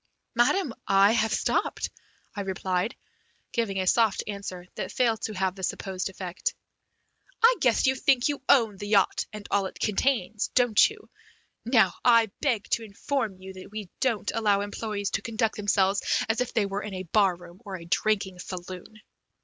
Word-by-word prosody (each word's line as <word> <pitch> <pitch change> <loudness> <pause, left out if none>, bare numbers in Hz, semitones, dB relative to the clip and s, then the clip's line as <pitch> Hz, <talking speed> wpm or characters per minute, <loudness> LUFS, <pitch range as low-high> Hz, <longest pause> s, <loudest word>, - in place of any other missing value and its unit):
"Madam, 255 +4 +2
I 195 +1 +5
have 225 -1 +1
stopped," - - 0 0.4
I 205 - -3
replied, 190 +2 -2 0.6
giving 225 -5 -1
a 185 - 0
soft 220 +2 +3
answer 200 -3 -6
that - - -5
failed 230 -3 +1
to 215 - -3
have 190 -1 0
the 190 - -11
supposed 190 0 -3
effect. 185 -1 -4 0.9
"I 485 +2 +7
guess 245 -3 +3
you 260 - +4
think 265 -1 +2
you 290 -2 -2
own 225 -7 +4
the 205 - -6
yacht 200 -3 +2
and 210 -1 -8
all 200 -1 +2
it - - -11
contains, 215 -1 0
don't 245 - +5
you? 430 0 -13 0.6
Now, 220 -7 +4
I 230 -3 +5
beg 235 -8 0
to 230 - +1
inform 220 0 -3
you 190 0 -10
that 185 0 -11
we 210 -3 -7
don't 230 -6 0
allow 205 -3 +2
employees 205 0 -3
to - - -1
conduct 225 -1 -1
themselves 200 -1 +2 0.3
as 225 +2 0
if 250 - -2
they 215 - +1
were 200 +1 -3
in 210 -3 -6
a 185 - -4
bar 190 +1 +3
room 175 +2 -15
or 200 -3 -6
a 170 - -11
drinking 195 0 0
saloon." 185 +4 -8
205 Hz, 175 wpm, -27 LUFS, 190-230 Hz, 0.9 s, I